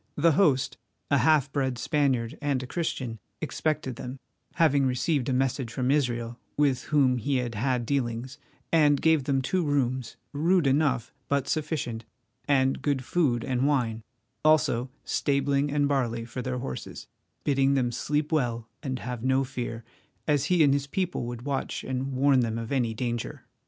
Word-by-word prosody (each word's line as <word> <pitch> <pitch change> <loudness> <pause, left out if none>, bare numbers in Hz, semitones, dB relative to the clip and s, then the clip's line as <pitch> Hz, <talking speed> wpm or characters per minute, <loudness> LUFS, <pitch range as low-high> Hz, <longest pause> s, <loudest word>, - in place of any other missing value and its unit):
The 165 +3 +4
host, 145 -5 +2 0.3
a 140 - +5
half 150 -3 +3
bred 130 -3 0
Spaniard 130 -4 0
and 140 -3 0
a - - -5
Christian, 125 -7 -3 0.2
expected 155 -5 -2
them, 125 +2 -6 0.4
having 145 -4 +4
received 130 +1 0
a - - +1
message 130 -1 0
from 125 +2 0
Israel, 120 -4 0 0.2
with 140 -4 +2
whom 130 -4 +3
he 135 +5 -1
had 120 -2 -2
had 125 +2 0
dealings, 125 -1 -2 0.3
and 150 -3 +4
gave 160 -3 +3
them 135 -1 +1
two 180 +7 0
rooms, 130 -5 -1 0.2
rude 170 +3 +2
enough, 135 -3 +1
but 140 -1 0
sufficient, 150 -7 -2 0.4
and 135 -2 +2
good 140 -2 0
food 130 -6 +1
and 130 +1 +1
wine, 120 -6 0 0.4
also 145 -5 +3 0.2
stabling 140 0 +1
and 145 0 +2
barley 120 -5 0
for 125 +2 -5
their 125 +1 -3
horses, 130 +2 -6 0.4
bidding 135 -1 +3
them 125 -3 +1
sleep 150 +5 -1
well 120 -7 0
and 130 -2 -3
have 125 -2 -5
no 130 +1 +3
fear, 120 -3 -5 0.4
as 145 -2 +2
he 175 -2 +4
and 140 -2 +5
his 140 0 -1
people 180 -5 -2
would 120 0 -6
watch 140 -1 -2
and 130 +1 -3
warn 135 +1 +4
them 115 -2 0
of 115 +1 -5
any 120 -5 0
danger. 120 -1 -3
135 Hz, 165 wpm, -27 LUFS, 125-145 Hz, 0.4 s, a